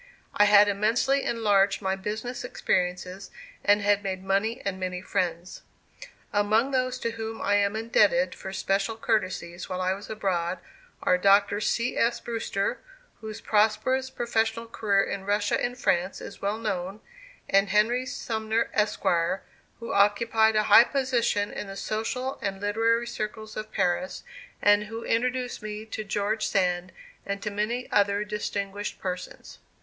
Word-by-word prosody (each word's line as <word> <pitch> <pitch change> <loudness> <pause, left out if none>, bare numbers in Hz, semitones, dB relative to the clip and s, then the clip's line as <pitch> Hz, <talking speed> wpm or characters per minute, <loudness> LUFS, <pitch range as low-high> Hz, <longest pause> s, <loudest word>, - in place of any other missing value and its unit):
I 210 - +5
had 205 0 +7
immensely 225 +7 +2
enlarged 205 -5 +2
my 190 -1 -1
business 215 +6 -5
experiences 180 -4 -2 0.3
and 205 0 +4
had 205 0 +3
made 190 -2 -4
money 200 +5 0
and 190 -1 -2
many 185 -1 -3
friends. 175 -2 -3 0.7
Among 215 +5 +2
those 255 -1 0
to 230 - -1
whom 225 -1 -6
I 200 - +1
am 200 +1 +1
indebted 245 - +2
for 190 - -8
special 195 +3 -1
courtesies 185 -6 -2
while 185 - -3
I 185 0 +1
was 200 +2 -9
abroad 185 -4 -1 0.5
are 180 - +3
Dr. 200 +2 +4
C. 235 +3 0
S. 235 +1 +2
Brewster, 225 -1 -2 0.4
whose 220 0 -7
prosperous 225 +5 +2
professional 230 -2 -1
career 205 -3 +1
in 195 -1 -4
Russia 205 +1 +1
and 245 0 -2
France 185 -5 0
is - - -10
well 200 +2 -1
known, 195 -2 -3 0.5
and 195 0 +3
Henry 235 +6 +2
Sumner, 220 -1 -2
Esq., 210 0 0 0.8
who 230 - -5
occupied 220 +2 +3
a 215 - +3
high 230 - +8
position 245 -6 0
in 210 - -6
the 195 - -7
social 250 +6 -3
and 195 -1 -3
literary 225 +3 +1
circles 215 -1 -5
of 215 0 -6
Paris 180 +11 -1 0.4
and 205 0 +5
who 225 +2 -7
introduced 250 +1 -1
me 215 0 -6
to 220 0 -5
George 210 +2 -1
Sand 180 -2 0 0.3
and 200 0 -3
to 210 - -2
many 220 +5 -2
other 200 0 +2
distinguished 205 -1 -4
persons. 180 -1 -6
210 Hz, 150 wpm, -27 LUFS, 195-225 Hz, 0.8 s, high